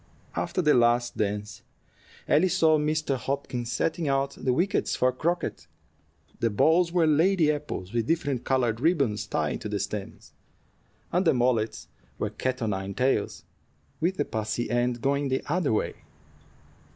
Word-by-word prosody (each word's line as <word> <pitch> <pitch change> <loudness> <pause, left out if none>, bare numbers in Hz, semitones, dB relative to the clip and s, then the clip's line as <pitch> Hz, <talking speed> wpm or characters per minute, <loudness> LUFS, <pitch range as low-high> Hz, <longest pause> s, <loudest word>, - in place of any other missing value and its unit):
After 185 - -1
the 150 -1 +5
last 120 0 +3
dance, 105 -1 -3 0.7
Ellie 155 +6 +4
saw 160 -3 +3
Mr. 150 -2 0
Hopkins 125 -2 -3
setting 165 +5 -1
out 135 0 +1
the 130 - -1
wickets 180 +11 +1
for 130 0 +2
croquet. 170 +7 -2 0.7
The 115 - +2
balls 165 - +3
were 175 -2 +3
lady 160 +1 +3
apples 145 -10 -5
with 115 -1 0
different 145 -6 0
colored 120 -4 +1
ribbons 140 - +1
tied - - -1
to - - -5
the - - -1
stems, - - -6 0.8
and 180 +2 +2
the 165 - +3
mallets 120 -3 0 0.3
were - - -2
cat 130 -1 -2
o' - - +1
nine 95 -2 -3
tails, 125 -5 0 0.6
with 180 +4 0
the 145 - 0
pussy 110 +2 -3
end 120 0 0
going 140 +1 +1
the 130 - -1
other 165 -3 0
way. 110 - -1
135 Hz, 150 wpm, -27 LUFS, 120-155 Hz, 0.8 s, the